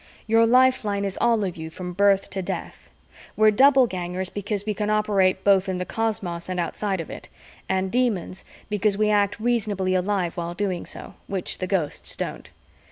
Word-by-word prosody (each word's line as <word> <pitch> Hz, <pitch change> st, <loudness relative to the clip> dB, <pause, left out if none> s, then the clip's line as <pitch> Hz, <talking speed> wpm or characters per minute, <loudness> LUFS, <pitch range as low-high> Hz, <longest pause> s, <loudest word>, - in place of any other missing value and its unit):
Your 225 Hz, +1 st, +4 dB
lifeline 235 Hz, -5 st, +3 dB
is 195 Hz, -1 st, -3 dB
all 230 Hz, -3 st, +3 dB
of 185 Hz, -3 st, -3 dB
you 160 Hz, 0 st, -6 dB
from 180 Hz, +2 st, -7 dB
birth 200 Hz, +1 st, +3 dB
to 190 Hz, -, -2 dB
death. 180 Hz, -, -6 dB, 0.5 s
We're 215 Hz, 0 st, +6 dB
Doublegangers 190 Hz, -8 st, +3 dB
because 205 Hz, 0 st, -3 dB
we 215 Hz, -, -1 dB
can 210 Hz, +1 st, -2 dB
operate 200 Hz, -3 st, +2 dB
both 195 Hz, -1 st, +4 dB
in 185 Hz, -, -1 dB
the 180 Hz, -, -3 dB
cosmos 195 Hz, -7 st, -3 dB
and 185 Hz, -1 st, -2 dB
outside 190 Hz, +3 st, -2 dB
of 165 Hz, -, -6 dB
it, -, -, -9 dB, 0.4 s
and 190 Hz, 0 st, 0 dB
Demons 220 Hz, -7 st, -1 dB, 0.2 s
because 210 Hz, -1 st, +1 dB
we 210 Hz, 0 st, +2 dB
act 205 Hz, 0 st, +1 dB
reasonably 210 Hz, -5 st, 0 dB
alive 185 Hz, -2 st, 0 dB
while 170 Hz, 0 st, -4 dB
doing 190 Hz, -3 st, -2 dB
so -, -, -7 dB
which 190 Hz, -2 st, -3 dB
the 185 Hz, -, -2 dB
Ghosts 175 Hz, -7 st, -2 dB
don't. -, -, -5 dB
200 Hz, 175 wpm, -24 LUFS, 185-215 Hz, 0.5 s, We're